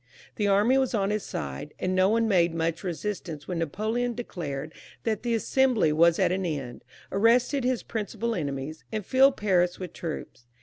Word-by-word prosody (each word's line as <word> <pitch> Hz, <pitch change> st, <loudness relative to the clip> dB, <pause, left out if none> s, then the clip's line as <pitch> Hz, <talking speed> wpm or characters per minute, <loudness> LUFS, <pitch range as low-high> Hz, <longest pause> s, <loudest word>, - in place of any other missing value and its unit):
The 205 Hz, -, +1 dB
army 210 Hz, +7 st, +4 dB
was 260 Hz, -3 st, 0 dB
on 200 Hz, -1 st, +1 dB
his 210 Hz, 0 st, 0 dB
side, 70 Hz, -, -6 dB
and 185 Hz, -, -1 dB
no 185 Hz, +1 st, +4 dB
one 225 Hz, +1 st, +2 dB
made 175 Hz, -5 st, +3 dB
much 165 Hz, +1 st, -1 dB
resistance 175 Hz, -4 st, -4 dB
when 180 Hz, -2 st, -2 dB
Napoleon 220 Hz, +9 st, -1 dB
declared 155 Hz, -, -5 dB, 0.3 s
that 220 Hz, -3 st, -1 dB
the 235 Hz, -1 st, 0 dB
Assembly 230 Hz, -, +2 dB
was 165 Hz, +2 st, +5 dB
at -, -, +2 dB
an 190 Hz, +1 st, -1 dB
end, 140 Hz, -8 st, -4 dB, 0.3 s
arrested 240 Hz, +6 st, +3 dB
his 250 Hz, -1 st, 0 dB
principal 230 Hz, +1 st, -3 dB
enemies, 145 Hz, -2 st, -4 dB
and 215 Hz, -3 st, -3 dB
filled 265 Hz, +3 st, +4 dB
Paris 180 Hz, -4 st, +2 dB
with 180 Hz, -3 st, -7 dB
troops. 150 Hz, -7 st, -7 dB
190 Hz, 175 wpm, -27 LUFS, 165-230 Hz, 0.3 s, was